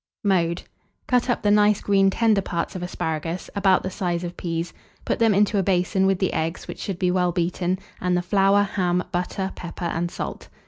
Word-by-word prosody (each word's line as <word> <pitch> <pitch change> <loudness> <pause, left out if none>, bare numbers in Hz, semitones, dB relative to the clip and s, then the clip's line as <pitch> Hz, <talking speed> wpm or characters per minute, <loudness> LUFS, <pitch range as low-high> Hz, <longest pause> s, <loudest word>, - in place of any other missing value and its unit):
Mode. 175 -4 +1 0.4
Cut 250 0 +1
up 245 - 0
the 205 - +3
nice 210 0 +4
green 195 -1 +3
tender 215 0 +2
parts 170 0 -3
of 185 - -4
asparagus, 165 -1 -3
about 195 -2 +3
the 185 - -3
size 175 -2 -2
of 175 0 -5
peas; 165 0 -3 0.3
put - - -1
them 225 -1 +4
into 205 0 +3
a - - +3
basin 190 +1 +2
with 195 -1 +2
the 190 0 0
eggs, 160 +2 -2
which - - -7
should 195 -4 -4
be 180 -1 +1
well 180 -1 +2
beaten, 175 +1 -1 0.2
and 180 -1 +1
the 175 - -1
flour, 195 +2 +3
ham, 180 -3 0
butter, 190 +2 -2
pepper, 175 0 -7
and 170 0 -1
salt. - - -6
185 Hz, 200 wpm, -23 LUFS, 175-195 Hz, 0.4 s, nice